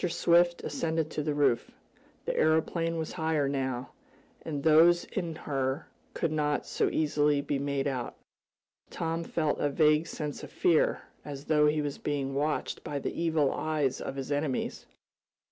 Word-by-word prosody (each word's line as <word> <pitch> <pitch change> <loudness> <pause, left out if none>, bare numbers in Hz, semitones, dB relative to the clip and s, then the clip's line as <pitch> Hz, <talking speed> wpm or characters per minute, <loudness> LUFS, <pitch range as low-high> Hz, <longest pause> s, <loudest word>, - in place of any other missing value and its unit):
Swift 175 0 +3
ascended 160 -1 -1
to - - -2
the 150 0 -1
roof. 145 -5 +2 0.6
The - - -1
aeroplane 165 +1 +1
was 160 -1 -3
higher 160 -4 0
now, 130 -3 -2 0.5
and 145 -3 -4
those 165 +2 +6
in 170 -5 -4
her 135 -1 -2 0.3
could 165 - 0
not 150 -1 0
so - - 0
easily 150 -1 +2
be 140 0 -2
made 140 -1 -1
out. 130 -4 -3 0.7
Tom 165 0 -2
felt 155 -3 -1
a 145 - +1
vague 150 +2 +3
sense 150 -2 -5
of - - -9
fear, 170 -3 +2 0.2
as 145 -1 -7
though 150 -1 +4
he 150 0 +1
was 145 -1 -4
being 140 -2 -2
watched 150 +2 -1
by 145 - -4
the 140 - -3
evil 160 -4 +1
eyes 150 -4 -1
of - - -5
his 135 +1 -5
enemies. 145 -2 -2
150 Hz, 160 wpm, -29 LUFS, 140-160 Hz, 0.7 s, those